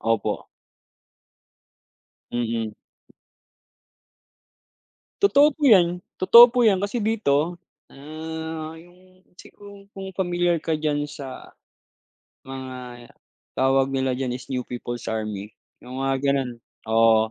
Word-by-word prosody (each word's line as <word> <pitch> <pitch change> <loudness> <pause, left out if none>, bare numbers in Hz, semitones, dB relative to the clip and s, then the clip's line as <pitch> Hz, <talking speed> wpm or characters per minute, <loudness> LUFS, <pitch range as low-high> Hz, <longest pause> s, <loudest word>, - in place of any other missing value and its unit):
Opo. 115 -1 -1 1.9
Mm. 115 -2 -2 2.5
Totoo 295 -6 +5
po 305 - -15
'yan, 180 -5 +5 0.2
totoo 235 +6 +9
po' 245 -1 +2
'yan. 195 -3 +3
Kasi 205 +4 -2
dito, 175 -7 0 0.3
ah, 160 +2 -7
'yong 180 +2 -19 0.2
siguro 200 -1 -14
kung 195 0 -7
familiar 175 -2 0
ka 160 0 -2
diyan 150 -1 -1
sa, 140 -3 -10 0.9
mga, 130 -2 -9 0.4
tawag 135 +1 +2
nila 130 -1 0
diyan 130 -2 -2
is 125 - -9
New 125 -2 -2
People's 120 -1 -6
Army, 105 -2 -4 0.3
'yong 125 +1 -9
mga 135 0 +1
gano'n. 135 -2 +1 0.4
Oo, 110 -1 +4
145 Hz, 105 wpm, -23 LUFS, 125-180 Hz, 2.5 s, totoo